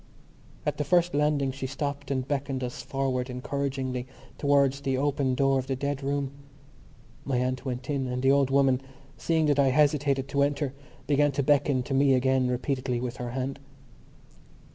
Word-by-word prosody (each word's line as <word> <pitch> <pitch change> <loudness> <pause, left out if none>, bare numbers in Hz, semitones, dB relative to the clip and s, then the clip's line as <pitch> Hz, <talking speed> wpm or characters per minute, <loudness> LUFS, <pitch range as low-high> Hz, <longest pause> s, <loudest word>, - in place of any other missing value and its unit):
At - - -1
the 150 - 0
first 175 +3 +2
landing 145 -2 +1
she 135 0 -5
stopped 140 +1 -4
and 130 -2 -1
beckoned 135 -2 -2
us 120 -1 -4
forward 130 -2 -2
encouragingly 130 -1 -3 0.3
towards 140 -1 +3
the 135 -2 0
open 140 -2 +1
door 135 0 +3
of 130 - -5
the 135 - -1
dead 140 +1 -2
room. 140 0 -1 0.9
My 135 -2 -1
aunt 130 +1 -1
went 125 0 -4
in 140 -3 -1
and 125 +1 -3
the 135 - +5
old 140 -1 +3
woman, 135 -1 +3 0.3
seeing 160 -1 +1
that 145 -1 +2
I 140 - +5
hesitated 140 -1 +2
to 140 -1 +1
enter, 140 -1 0 0.3
began 145 0 +3
to 140 - 0
beckon 140 -2 +2
to 135 - -4
me 135 0 +4
again 130 0 +2
repeatedly 125 0 -1
with 125 0 -4
her 120 -1 -4
hand. 130 +2 -3
135 Hz, 175 wpm, -27 LUFS, 130-140 Hz, 0.9 s, the